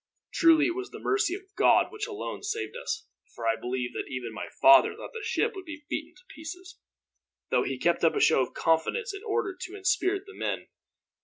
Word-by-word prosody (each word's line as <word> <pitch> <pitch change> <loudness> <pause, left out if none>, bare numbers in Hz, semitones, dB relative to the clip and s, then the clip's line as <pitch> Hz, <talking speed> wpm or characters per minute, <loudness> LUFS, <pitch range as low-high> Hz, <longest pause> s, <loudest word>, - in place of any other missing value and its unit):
Truly 325 -3 +5
it 345 - 0
was 380 +1 -5
the - - -9
mercy 385 -3 +1
of 395 - -9
God - - +4
which 430 -1 -4
alone 425 -2 -5
saved 435 +2 -3
us, 450 -2 -4 0.3
for 115 - -6
I 115 - +3
believe 125 0 -3
that - - -4
even 125 -3 -5
my 110 - -5
father 330 +1 +7
thought - - -9
the 460 - -6
ship 425 - 0
would 380 -1 -8
be 300 -2 -9
beaten 310 +3 -4
to 370 0 -17
pieces, 355 +3 -9 0.7
though - - +4
he 135 - -2
kept 170 +6 +1
up 165 - +4
a - - +1
show - - +5
of 130 - -3
confidence 170 - +1
in 400 - -7
order 420 -3 -1
to 370 +1 -8
inspirit 385 0 +1
the 405 - -12
men. - - -3
365 Hz, 215 wpm, -28 LUFS, -, 0.7 s, father